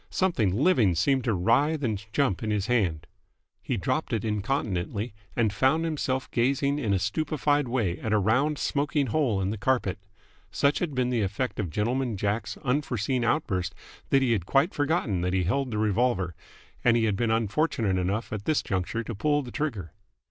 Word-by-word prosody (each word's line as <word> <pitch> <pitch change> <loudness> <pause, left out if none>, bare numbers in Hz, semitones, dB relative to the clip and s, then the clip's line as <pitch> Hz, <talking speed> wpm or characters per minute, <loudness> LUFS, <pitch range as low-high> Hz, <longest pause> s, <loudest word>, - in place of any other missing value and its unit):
Something 165 - +1
living 120 - +3
seemed 130 - +2
to 115 -4 +1
writhe 140 - +2
and 105 -5 -1
jump 135 -9 +1
in 110 - -2
his 105 -2 0
hand. 95 -11 0 0.6
He 125 - -2
dropped 130 - -1
it 115 -1 -1
incontinently, 105 -1 -2 0.2
and 110 -4 +1
found 135 +11 +2
himself 135 -5 -2
gazing 140 +4 +1
in 115 -8 -1
a 100 - +3
stupefied 145 - 0
way 110 -8 -1
at 110 - -3
a 110 - +4
round, 125 +9 +2
smoking 145 +1 0
hole 120 -4 +1
in 95 +1 -1
the 110 - -5
carpet. 100 -4 0 0.5
Such 140 +1 +1
had 160 -6 -2
been 125 -1 +1
the 120 -3 +1
effect 105 +6 -2
of 100 -5 -1
Gentleman 115 - -1
Jack's 105 +3 -2
unforeseen 125 -2 0
outburst 95 - 0 0.3
that 135 -1 +4
he 125 - +2
had 95 -6 0
quite 140 +7 +2
forgotten 145 - 0
that 90 +1 -1
he 95 -1 +2
held 130 +9 0
the 110 - -3
revolver, 105 -3 +1 0.5
and 120 -1 +4
he 115 - +2
had 105 -3 +1
been 115 +3 0
unfortunate 110 - +1
enough 100 +6 -2
at 105 -1 -5
this 155 - +1
juncture 95 +4 -2
to 115 - -5
pull 145 +7 +1
the 125 - -9
trigger. 115 - -3
115 Hz, 185 wpm, -27 LUFS, 100-135 Hz, 0.6 s, a